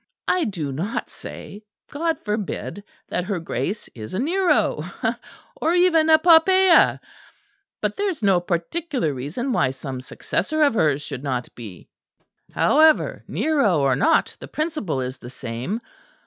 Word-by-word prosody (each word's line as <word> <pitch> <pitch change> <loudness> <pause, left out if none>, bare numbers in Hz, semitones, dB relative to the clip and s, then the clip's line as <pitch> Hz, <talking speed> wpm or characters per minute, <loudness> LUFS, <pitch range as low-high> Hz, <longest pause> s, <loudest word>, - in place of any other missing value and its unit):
I 365 -2 +2
do 165 -10 -3
not 170 +11 -4
say 205 - -10 0.3
(God 325 +2 -1
forbid) 210 -1 -4 0.3
that 180 - -2
her 195 -2 -2
Grace 190 +5 -3
is 110 +8 -8
a - - -1
Nero, 355 +7 +1 0.7
or 325 +3 0
even 335 -3 +4
a 315 - +8
Poppæa; 350 +2 +5 0.8
but - - -2
there 405 0 0
is 320 - -5
no 195 -3 +4
particular 175 - -2
reason 150 - -4
why 130 - +2
some 130 0 -6
successor 310 - -1
of 285 - +4
hers 150 -8 +1
should 135 -4 -6
not 130 -3 -3
be. 105 -7 -11 0.6
However, 310 +1 +3
Nero 275 - +1
or 135 -2 +3
not, 235 - +2
the - - -9
principle 300 - -2
is 130 +1 -5
the 120 - -10
same. 125 - -5
205 Hz, 145 wpm, -22 LUFS, -, 0.8 s, a